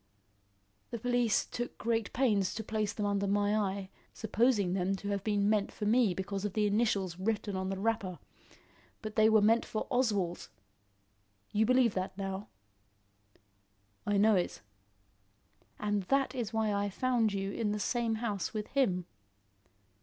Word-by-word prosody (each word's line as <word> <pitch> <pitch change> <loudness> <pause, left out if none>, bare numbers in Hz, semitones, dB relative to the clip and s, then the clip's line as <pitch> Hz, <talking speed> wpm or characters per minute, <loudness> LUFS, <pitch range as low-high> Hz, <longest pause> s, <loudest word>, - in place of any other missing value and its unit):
"The 235 - -4
police 245 -1 +1
took 240 0 -5
great 225 -2 -1
pains 210 -7 +1
to 220 - -4
place 215 -1 -1
them 210 0 -3
under 200 0 0
my 205 +1 +2
eye, 195 -2 -2 0.2
supposing 220 -4 +1
them 190 +1 0
to 200 +1 -5
have 200 -1 -2
been 205 -1 +1
meant 210 -1 +1
for 210 - -5
me 220 -3 +3
because 195 +1 -4
of 205 -2 -2
the 215 -1 +1
initials 200 -4 0
written 205 0 -1
on 190 0 -2
the 195 - -3
wrapper. 200 -3 -1 0.9
But 215 -1 -6
they 220 0 +5
were 220 -1 +5
meant 225 +2 +4
for 215 - -3
Oswald. 205 - 0 1.0
You 215 +1 +2
believe 255 -3 +4
that 185 0 -3
now?" 195 +1 -4 1.6
"I 205 -1 +1
know 215 +2 +5
it." 180 -9 -2 1.2
"And 205 -1 0
that 275 +5 +1
is 240 -5 -3
why 220 -2 0
I 200 0 0
found 235 +1 +1
you 195 0 -2
in 210 0 -1
the 210 - -2
same 230 +1 0
house 215 -4 -3
with 210 -1 -3
him." 190 -11 +1
210 Hz, 160 wpm, -31 LUFS, 195-225 Hz, 1.6 s, they